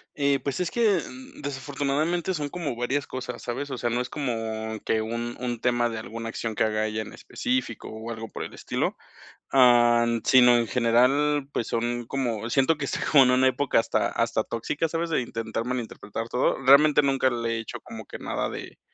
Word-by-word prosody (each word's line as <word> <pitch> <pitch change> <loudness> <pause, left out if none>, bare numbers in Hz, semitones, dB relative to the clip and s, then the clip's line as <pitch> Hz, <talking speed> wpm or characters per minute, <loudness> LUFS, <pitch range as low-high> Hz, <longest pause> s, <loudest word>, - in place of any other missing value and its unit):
Eh, 140 -1 +2
pues 140 +2 -2
es 180 - -1
que, 215 -6 +3
mm, 260 +1 -12
desafortunadamente 145 +5 -1
son 150 -4 -3
como 160 -5 -4
varias 125 +4 -1
cosas, 125 -2 -6
¿sabes? 130 +4 -4
O 130 - -4
sea, 120 0 -1
no 120 +1 0
es 125 - -5
como 110 -5 -3
que 110 -1 +1
un 115 +2 -4
un 120 -2 -3
tema 120 -1 +1
de 115 - -4
alguna 115 +2 -6
acción 110 -1 -4
que - - +2
haga 110 0 0
ella 110 0 -3
en 110 - -8
específico 255 +1 -3
o 110 +1 -7
algo 115 0 -6
por - - -6
el - - -8
estilo, - - -2 0.5
am, 120 -2 +5
sino, 125 -2 +6
en 120 - +1
general, 135 +4 +2
pues 115 - -2
son 120 0 -2
como, 120 -5 -2
siento 135 +5 +3
que 145 - -4
está - - -2
como 140 -3 +8
en 125 - +3
una 130 +1 +4
época 135 -2 +2
hasta - - 0
hasta 115 -1 0
tóxica, 145 +8 -2
¿sabes? 165 +1 -2
De 155 - +2
intentar 115 -1 -4
malinterpretar 115 -2 -4
todo. 125 - +1
Realmente 145 +3 +6
nunca 135 -1 +2
le 115 -1 -2
he - - -2
hecho 115 - -7
como - - -9
que - - -8
nada - - -2
de - - -8
125 Hz, 205 wpm, -26 LUFS, 115-140 Hz, 0.5 s, como